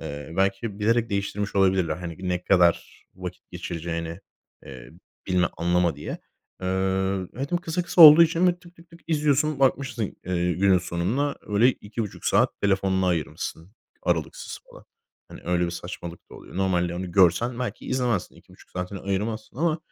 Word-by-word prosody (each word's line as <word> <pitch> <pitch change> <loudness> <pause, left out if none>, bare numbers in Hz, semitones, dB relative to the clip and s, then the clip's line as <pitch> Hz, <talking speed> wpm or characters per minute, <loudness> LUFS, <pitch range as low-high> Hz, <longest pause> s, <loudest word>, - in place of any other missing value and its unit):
Eee, 70 +2 -7
belki 95 +2 0
bilerek 115 +2 +1
değiştirmiş 100 0 -2
olabilirler, 95 -5 +2
hani, 85 -2 -7
ne 90 0 -1
kadar 90 -3 +2
vakit - - -9
geçireceğini, 85 +1 -5 0.4
eee, 65 -2 -11 0.4
bilme, 90 -2 +2
anlama 85 -2 +1
diye. 75 - -6 0.4
Eee, - - -2 0.7
ve 135 +3 -4
de - - 0
o - - +4
kısa 175 0 -2
kısa 175 0 +5
olduğu 155 +2 +11
için 165 +2 +3
bi 175 0 0
tık 175 0 -18
tık 170 +1 -19
tık 170 - -16
izliyorsun, 150 -2 +1
bakmışsın, 130 -3 +1 0.2
eee, 90 -1 0
günün 95 +1 +3
sonunda 100 - -1
öyle 105 +4 +3
2,5 110 -3 -5
saat - - +2
telefonuna 95 -1 +1
ayırmışsın 85 +1 -3 0.3
aralıksız - - -2
falan. - - -15 0.4
Hani, - - -11
öyle 90 0 +1
bir 85 - -3
saçmalık 85 0 -8
da - - -12
oluyor. - - -12
Normalde 90 -2 0
onu 90 0 -5
görsen 115 +7 +3
belki 125 - -5
izlemezsin. 125 -7 -1
2,5 - - -19
saatini 90 +2 -5
ayırmazsın 110 +5 -3
ama 160 +1 +1
95 Hz, 160 wpm, -25 LUFS, 90-130 Hz, 0.7 s, olduğu